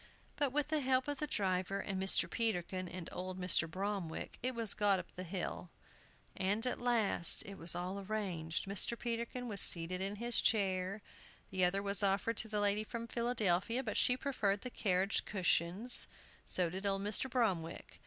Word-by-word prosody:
But 285 -3 0
with 295 +2 0
the 310 -1 +1
help 260 -1 +1
of 290 -2 -3
the 300 - -2
driver, 190 -3 0
and 195 -2 -3
Mr. 190 - +4
Peterkin, 185 -5 -1
and 175 -1 -7
old 185 +1 -5
Mr. 180 -3 +4
Bromwick, 190 -2 -4
it 255 0 -1
was 230 -3 +3
got 205 -2 +2
up 180 - -7
the 180 - -8
hill. 180 -1 -5 0.7
And 200 +5 0
at 250 - -2
last 225 -8 +3
all 200 - -7
was 170 +1 +3
arranged. 185 -3 -3
Mr. 200 +4 0
Peterkin 235 +1 -3
was 205 -4 +2
seated 175 +2 +3
in 195 +2 -2
his 235 +3 0
chair. 195 -1 +1 0.5
The 185 -1 0
other 195 +3 0
was 200 -1 0
offered 200 +3 +1
to 220 - 0
the 210 -1 -2
lady 205 +1 +1
from 230 +1 -6
Philadelphia, 235 -1 0
but 215 -4 -4
she 250 - +3
preferred 210 -8 -1
the 250 - -6
carriage 195 -2 +1
cushions; 190 +4 +2 0.4
so 175 -3 0
did 190 +3 -3
old 195 0 0
Mr. 210 +6 0
Bromwick. 195 -10 -2
200 Hz, 175 wpm, -35 LUFS, 185-230 Hz, 0.7 s, Mr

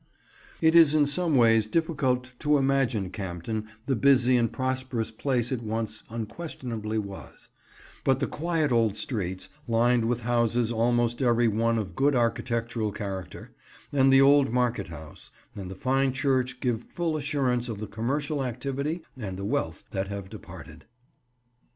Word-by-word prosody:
It 160 0 +4
is 160 -3 +7
in 150 -1 +5
some 160 0 +2
ways 115 -2 +4
difficult 130 -4 0
to 150 -1 +3
imagine 135 -8 +1
Campden 100 +3 -4 0.2
the 135 - +1
busy 130 0 +4
and 120 -2 +2
prosperous 130 -3 -2
place 125 +1 -1
it 125 -3 -2
once 110 -1 -3
unquestionably 115 -2 -5
was; 100 -2 -7 0.5
but 135 -1 +2
the 140 - +1
quiet 160 0 -1
old 115 -3 +2
streets, 95 -5 -3 0.2
lined 120 0 +3
with 120 +1 0
houses 120 0 +1
almost 120 +1 +1
every 120 -2 +3
one 115 +2 +1
of 95 -5 -4
good 140 +1 +2
architectural 115 -2 -1
character; 95 -3 -6 0.4
and 135 -1 +4
the 135 0 +7
old 140 -2 +5
market 120 -4 0
house, 80 -2 -10 0.3
and 95 -3 -6
the 95 - -7
fine 130 +5 +1
church 130 -2 0
give 120 -3 0
full 170 -2 -2
assurance 135 -5 0
of 110 - -4
the 110 - -4
commercial 135 +8 -2
activity 140 +6 -3
and 100 -7 -6
the 100 - -5
wealth - - -2
that 95 0 -2
have 100 -1 -6
departed. 85 -7 -11
120 Hz, 150 wpm, -27 LUFS, 110-135 Hz, 0.5 s, is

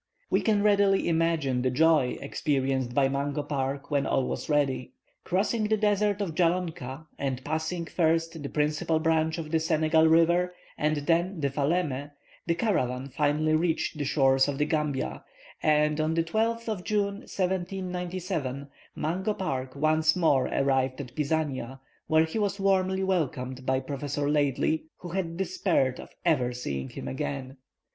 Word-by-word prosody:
We - - +3
can 210 -2 +2
readily 200 -2 +3
imagine 160 -6 +1
the 130 - +1
joy 150 -1 +3
experienced 135 -3 -1
by 140 -1 +4
Mungo 140 +2 -2
Park 140 0 -3
when 140 -1 +1
all 130 - +1
was - - -4
ready. 135 -4 0 0.3
Crossing 210 +4 0
the 215 +1 +2
desert 205 -1 +1
of 185 -5 -2
Jallonka, 165 -5 -1
and 130 -2 -3
passing 160 +3 -2
first 165 0 0
the 140 - -5
principal 155 +2 0
branch 160 0 +1
of 155 -2 -6
the 165 - +3
Senegal 160 0 +3
river, 170 +2 +3 0.2
and 155 0 0
then 175 +2 +1
the 140 -2 0
Falemé, 145 -1 0 0.4
the 170 - +2
caravan 135 - 0
finally 150 +3 +1
reached 160 -1 0
the - - 0
shores 135 -2 +3
of 140 -1 -2
the 150 - +2
Gambia, 150 - -2 0.4
and 150 0 +3
on 155 +1 0
the 165 - +2
12th 225 +6 -1
of 210 -5 -3
June, 200 -1 0
1797, 180 -6 -3 0.3
Mungo 190 +6 -1
Park 130 -8 -3
once 155 +2 +3
more 145 -7 +3
arrived 135 -1 +1
at 125 -4 -7
Pisania, 140 -4 -2 0.3
where 160 0 +4
he 160 +7 -3
was 200 -1 -1
warmly 190 -1 +2
welcomed 130 -8 -2
by 130 0 +3
Dr. 145 +1 -3
Laidley, 150 +1 +1
who 175 - -8
had 170 -2 -3
despaired 165 -8 0
of - - -9 0.2
ever 130 -7 +2
seeing 70 - -4
him 65 - -7
again. 130 - -4
155 Hz, 155 wpm, -27 LUFS, 135-175 Hz, 0.4 s, by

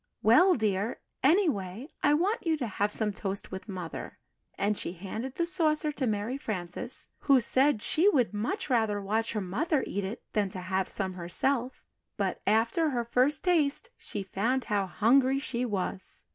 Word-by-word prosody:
"Well, 350 - +6
dear, 210 -1 -1 0.2
anyway 265 - +1
I 290 0 +4
want 370 +4 0
you 320 -1 +2
to 265 - -2
have 205 -1 -1
some 210 -1 +1
toast 195 -1 -3
with 190 +3 -7
Mother" 180 -4 -6 0.4
and 210 +1 +1
she 175 - -4
handed 215 +8 -6
the 340 - 0
saucer 310 -3 +1
to 275 -3 -2
Mary 220 +5 -2
Frances, 180 -8 -4
who 275 -2 +5
said 260 0 +2
she 355 +6 +3
would 250 - +2
much 225 - -2
rather 220 -6 +1
watch 220 +4 -1
her 215 - -1
mother 270 - 0
eat 200 - -3
it 195 +5 -5
than 205 -3 +1
to 185 - -6
have 190 +1 -1
some 190 -1 -3
herself; 235 +9 -1 0.3
but, - - -1
after 230 +9 +3
her 240 -4 -1
first 255 +5 +2
taste, 345 +5 +1
she 205 - -6
found 230 +7 0
how 205 -4 0
hungry 255 - +3
she 250 -3 -2
was. 190 -2 -4
225 Hz, 175 wpm, -29 LUFS, 200-280 Hz, 0.4 s, Well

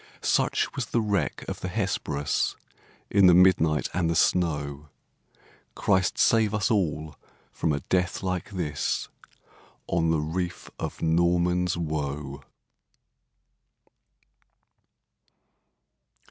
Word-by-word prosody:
Such - - +1
was 125 -3 -3
the 120 - 0
wreck 105 -3 -1
of - - -5
the - - -4
Hesperus, 90 -7 -1 0.6
In 100 -2 +6
the 90 - +7
midnight 85 -4 +4
and 85 -1 0
the 85 - 0
snow! 75 -4 0 0.9
Christ 95 -1 +1
save 110 -2 +3
us 105 +2 0
all 80 -7 -1 0.4
from 80 - -1
a 70 -1 -1
death 90 +5 -1
like 90 -2 -2
this, 85 -7 -2 0.8
On 80 -1 0
the 80 -1 +2
reef 85 +4 -4
of - - -5
Norman's 85 +1 +2
Woe! 75 -3 -4
85 Hz, 105 wpm, -26 LUFS, 75-95 Hz, 0.9 s, the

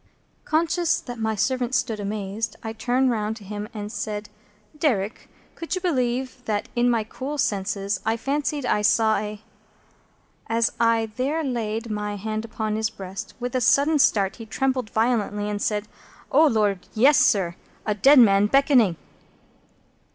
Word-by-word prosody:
Conscious 335 +2 +1
that 245 -2 -8
my 220 0 -1
servant 255 +3 0
stood 230 -4 0
amazed, 205 +1 -3
I 220 -1 -4
turned 245 +3 +1
round 215 -1 -2
to 215 - -13
him, 205 +2 -6
and 210 -1 -6
said: 210 -2 -4 0.5
"Derrick, 240 -9 -1 0.2
could 330 +3 -4
you - - -2
believe 255 -6 -1
that 210 -1 -2
in 240 0 +3
my 230 -2 +1
cool 270 +6 -6
senses 200 -3 -1
I 225 +1 0
fancied 285 +2 -2
I 210 - +1
saw 220 +1 +3
a 210 +1 -5 0.5
—" - - -35
As 230 0 +2
I 230 -1 +2
there 290 +6 0
laid 230 -4 -3
my 210 0 -3
hand 215 +2 -3
upon 215 -1 -3
his 220 0 0
breast, 195 -2 -8
with 245 0 -4
a 255 - +1
sudden 290 +6 +4
start 205 -7 +2
he 225 -2 -9
trembled 255 0 -1
violently, 220 -3 0
and 205 -1 -3
said, 210 0 -1 0.4
"O 305 +3 +6
Lord, 205 -7 0
yes, 265 +6 +5
sir! 185 -5 +3 0.3
A 210 - +1
dead 275 +8 +5
man 205 -4 +6
beckoning!" 255 - +4
225 Hz, 160 wpm, -24 LUFS, 210-255 Hz, 0.5 s, O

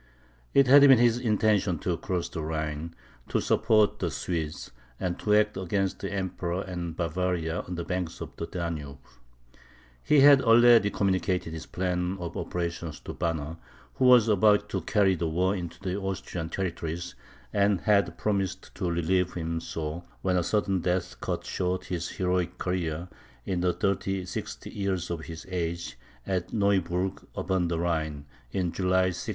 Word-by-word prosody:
It 140 - +7
had 140 +3 +8
been 135 -2 +8
his 120 0 +4
intention 105 -5 +2
to 90 - 0
cross 90 +1 -2
the 80 - -5
Rhine, 80 +1 -3 0.3
to - - +1
support 110 -2 +3
the - - 0
Swedes, 80 -3 -4 0.3
and 90 -2 -2
to 105 -1 +2
act 105 -1 +2
against 95 +1 -1
the 100 - -4
Emperor 95 -1 -2
and 85 -3 -5
Bavaria 85 0 -1
on 90 - -5
the 85 - -3
banks 90 -1 -3
of - - -8
the 85 - -5
Danube. 80 -5 -4 1.0
He 145 - +4
had 140 -1 +8
already 115 -2 +6
communicated 95 -4 0
his 80 - -7
plan 90 0 -1
of 85 -1 -5
operations 85 -2 -4
to - - -7
Banner, 80 -2 -2 0.4
who 130 - +1
was 125 -3 +7
about 105 0 +4
to - - -2
carry 100 -3 +3
the 85 -2 -1
war 90 +5 +1
into 85 -3 -6
the 95 0 -3
Austrian 90 -4 -4
territories, 85 -2 -3 0.4
and 100 -2 +2
had 105 -2 +2
promised 100 -3 -2
to 90 - -2
relieve 85 +2 +1
him 85 -1 -2
so, 80 +1 -5 0.2
when 95 -1 +2
a 90 - +3
sudden 100 +1 +1
death 90 +1 -2
cut - - -3
short 90 0 -2
his 85 -2 -3
heroic 90 -1 -1
career, 85 -2 -2 0.4
in 90 -2 -1
the 90 0 +3
36th 95 -2 -2
year 100 -2 0
of 80 -2 -4
his 80 0 -8
age, 85 -4 -3 0.3
at 95 -3 -2
Neuburgh 95 -3 0
upon 95 -2 0
the 85 -1 -1
Rhine 80 -4 -1 0.3
(in 90 -3 -1
July, 95 0 +2
1639). 90 +5 -5
90 Hz, 160 wpm, -28 LUFS, 85-100 Hz, 1.0 s, had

